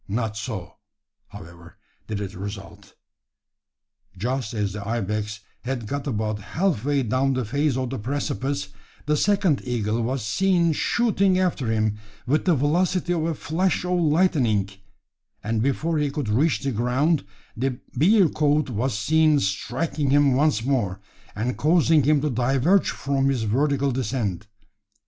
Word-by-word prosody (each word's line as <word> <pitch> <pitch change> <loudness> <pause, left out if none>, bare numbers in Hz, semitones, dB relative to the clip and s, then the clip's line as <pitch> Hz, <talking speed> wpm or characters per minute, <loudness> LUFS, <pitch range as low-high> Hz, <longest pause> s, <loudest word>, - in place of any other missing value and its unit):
Not 110 +1 -2
so, 110 -6 -6 0.5
however, 85 +1 -13 0.3
did 105 -2 -3
it 100 -1 -5
result. 100 0 -9 1.2
Just 125 +3 -2
as 100 -3 -1
the 105 -1 -6
ibex 105 -1 -3 0.2
had 125 -2 -3
got 140 +6 -4
about 110 -4 -2
half 160 - -1
way 140 -1 +1
down 130 +4 +1
the 130 -2 -1
face 140 +4 0
of 130 -1 -2
the 135 - -4
precipice, 135 -3 -2 0.4
the 150 +1 +2
second 190 -3 +2
eagle 115 -2 -1
was 125 0 -2
seen 170 - +2
shooting 200 0 +2
after 180 -9 0
him 110 -1 0 0.3
with 145 +4 +1
the 180 -3 +4
velocity 175 +5 +1
of 160 -2 -1
a 165 -1 -1
flash 180 +5 -1
of 180 0 +1
lightning; 150 - +2 0.7
and 110 +1 -1
before 150 +5 0
he 145 -1 +1
could 140 -5 -3
reach 125 +2 +2
the 135 0 -1
ground, 130 +7 +1 0.3
the 130 +1 -2 0.2
bearcoot 155 - +3
was 120 0 -1
seen 155 +5 +3
striking 130 +9 -2
him 140 -1 +4
once 135 -4 +2
more, 105 -9 0 0.4
and 120 +4 -2
causing 160 0 +4
him 145 +1 +3
to 150 - 0
diverge 135 - +2
from 135 -1 0
his 130 -4 0
vertical 140 +5 +1
descent. 110 -6 -2
135 Hz, 145 wpm, -24 LUFS, 110-155 Hz, 1.2 s, the